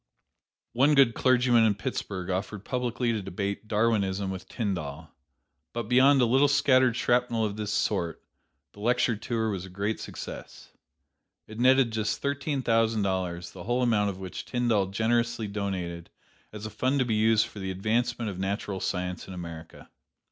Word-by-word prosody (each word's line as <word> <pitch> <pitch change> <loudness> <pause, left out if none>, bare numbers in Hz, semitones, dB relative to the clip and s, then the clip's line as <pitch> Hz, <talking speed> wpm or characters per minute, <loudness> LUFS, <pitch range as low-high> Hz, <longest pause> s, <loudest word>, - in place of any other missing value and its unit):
One 140 +5 +4
good 135 -4 +5
clergyman 125 -2 +4
in 110 -2 +3
Pittsburgh 95 -2 -4
offered 100 +2 -4
publicly 125 -1 -1
to 110 - -2
debate 100 +3 -4
"Darwinism" 100 -3 +1
with 95 -1 -7
Tyndall, 80 - -4 0.6
but 120 0 -2
beyond 130 +5 +5
a 125 - +5
little 135 +5 +4
scattered 130 -3 +4
shrapnel 120 -2 +1
of 100 -1 -3
this 105 -1 -3
sort, 95 -4 -1 0.5
the - - -16
lecture 120 +1 +2
tour 110 +1 -2
was 95 -3 -4
a 95 - -9
great 100 +4 -2
success. - - -9 0.7
It 110 +1 -10
netted 130 -1 +5
just 110 -1 -1
thirteen 140 -1 -2
thousand 115 -2 +2
dollars, 90 -3 -2
the 90 -2 -10
whole 120 +2 +1
amount 105 -4 +2
of 95 - -5
which 95 -1 -6
Tyndall 120 -6 +1
generously 115 +2 0
donated 95 -5 -4 0.4
as 105 0 -8
a 110 - -5
fund 130 +6 0
to 130 - +2
be 115 - 0
used 110 0 +3
for 105 - -10
the 95 -1 -4
advancement 110 +4 -1
of 95 - -8
natural 95 0 -2
science 90 -1 -3
in 95 - -8
America. 85 -2 -9
110 Hz, 165 wpm, -27 LUFS, 95-120 Hz, 0.7 s, good